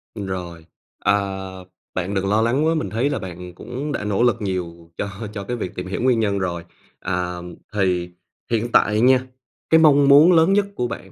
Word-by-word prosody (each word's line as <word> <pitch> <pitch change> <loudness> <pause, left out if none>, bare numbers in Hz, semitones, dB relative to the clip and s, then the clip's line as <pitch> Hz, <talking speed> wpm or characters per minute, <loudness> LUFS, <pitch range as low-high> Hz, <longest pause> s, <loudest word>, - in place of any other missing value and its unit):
Rồi, 90 -5 -6 0.3
à, - - +2 0.8
bạn 95 +2 -3
đừng 95 -1 -1
lo 105 +2 +3
lắng 125 +7 +1
quá, 160 - +3
mình 155 - -2
thấy 120 +6 0
là 145 - -2
bạn 90 -2 -8
cũng 125 +9 -6
đã 135 - -3
nỗ 105 +2 0
lực 120 -1 +3
nhiều 85 -4 -5
cho 100 - -3 0.2
cho 100 -2 -5
cái 120 +5 -4
việc 95 -5 -5
tìm 90 0 -5
hiểu 95 - -4
nguyên 125 -2 +3
nhân 100 -3 0
rồi. 85 -2 -3 0.4
À, 90 0 -3 0.4
thì 90 -3 0 0.4
hiện 120 +1 0
tại 105 -1 +3
nha, 130 +1 +4 0.4
cái 160 - +6
mong 145 -3 +5
muốn 150 +5 +8
lớn 165 +2 +5
nhất 205 0 +3
của 125 - -1
bạn 105 -5 -8
105 Hz, 200 wpm, -21 LUFS, 90-130 Hz, 0.8 s, muốn